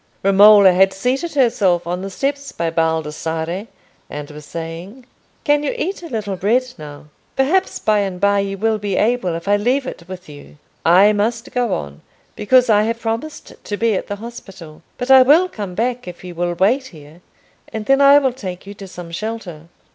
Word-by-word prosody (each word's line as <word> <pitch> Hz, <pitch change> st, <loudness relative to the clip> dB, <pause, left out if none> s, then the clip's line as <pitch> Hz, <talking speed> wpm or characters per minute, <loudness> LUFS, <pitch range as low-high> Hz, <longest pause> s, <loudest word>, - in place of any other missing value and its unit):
Romola 200 Hz, 0 st, +7 dB
had 190 Hz, +1 st, +3 dB
seated 265 Hz, -, -2 dB
herself 215 Hz, -, +2 dB
on 175 Hz, +1 st, -3 dB
the 195 Hz, -, -5 dB
steps 280 Hz, +6 st, -3 dB
by 165 Hz, -1 st, -3 dB
Baldassarre, 160 Hz, +3 st, -2 dB, 0.4 s
and 150 Hz, 0 st, -7 dB
was 150 Hz, 0 st, -12 dB
saying, 170 Hz, +9 st, -8 dB, 0.4 s
"Can 290 Hz, -1 st, +2 dB
you 295 Hz, -, -2 dB
eat 375 Hz, +5 st, -3 dB
a 335 Hz, -, -9 dB
little 215 Hz, -5 st, -3 dB
bread 215 Hz, +8 st, +1 dB, 0.2 s
now? 150 Hz, -1 st, -10 dB, 0.3 s
perhaps 335 Hz, +9 st, +1 dB
by 215 Hz, -1 st, +1 dB
and 190 Hz, -3 st, -3 dB
by 200 Hz, +1 st, +2 dB
you 195 Hz, 0 st, -3 dB
will 220 Hz, +1 st, 0 dB
be 205 Hz, -1 st, -3 dB
able, 225 Hz, -7 st, +1 dB
if 170 Hz, +3 st, -7 dB
I 205 Hz, 0 st, +3 dB
leave 250 Hz, +6 st, 0 dB
it 175 Hz, -9 st, -8 dB
with 185 Hz, -1 st, -9 dB
you. 145 Hz, 0 st, -13 dB, 0.3 s
I 190 Hz, +5 st, +5 dB
must 225 Hz, +3 st, -2 dB
go 245 Hz, -4 st, 0 dB
on, 70 Hz, 0 st, -7 dB, 0.3 s
because 250 Hz, +4 st, +3 dB
I 210 Hz, -2 st, +4 dB
have 230 Hz, +1 st, -2 dB
promised 230 Hz, +7 st, -5 dB
to 205 Hz, -, -4 dB
be 230 Hz, 0 st, +1 dB
at 190 Hz, -, -3 dB
the 205 Hz, -, -4 dB
hospital. 195 Hz, -8 st, -11 dB, 0.2 s
But 250 Hz, +1 st, -2 dB
I 265 Hz, -1 st, +9 dB
will 305 Hz, +8 st, +5 dB
come 205 Hz, -, -7 dB
back 245 Hz, 0 st, -2 dB
if 180 Hz, 0 st, -9 dB
you 180 Hz, -1 st, -8 dB
will 175 Hz, 0 st, -2 dB
wait 240 Hz, +10 st, +1 dB
here, 155 Hz, -, -15 dB, 0.5 s
and 220 Hz, -1 st, -5 dB
then 270 Hz, +3 st, +3 dB
I 280 Hz, +1 st, +7 dB
will 265 Hz, -3 st, +1 dB
take 185 Hz, -8 st, -7 dB
you 200 Hz, -, -9 dB
to 200 Hz, -1 st, -11 dB
some 175 Hz, -2 st, -10 dB
shelter. 180 Hz, -5 st, -6 dB
205 Hz, 195 wpm, -19 LUFS, 175-245 Hz, 0.5 s, I